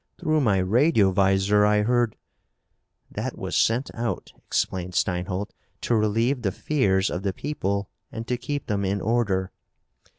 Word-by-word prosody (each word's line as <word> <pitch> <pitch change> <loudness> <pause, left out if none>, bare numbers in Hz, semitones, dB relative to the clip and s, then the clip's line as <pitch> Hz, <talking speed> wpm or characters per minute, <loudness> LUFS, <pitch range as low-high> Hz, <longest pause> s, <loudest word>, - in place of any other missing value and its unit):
"Through 155 -1 +1
my 105 -7 +3
radiovisor 100 - +3
I 105 0 +3
heard 120 0 +1 0.5
" - - -43
"That - - -3
was - - -4
sent 120 +4 +2
out," 115 0 -4
explained 90 -1 -1
Steinholt, 90 +2 -1 0.3
"to 120 - +1
relieve 115 +5 +1
the 100 -4 0
fears 100 -7 +1
of 90 - -3
the 95 -1 -1
people 100 -7 -2 0.2
and 115 0 -6
to 125 - 0
keep 145 +3 -4
them 100 -2 -1
in 100 +1 0
order." 100 -4 0
105 Hz, 145 wpm, -25 LUFS, 95-120 Hz, 0.5 s, my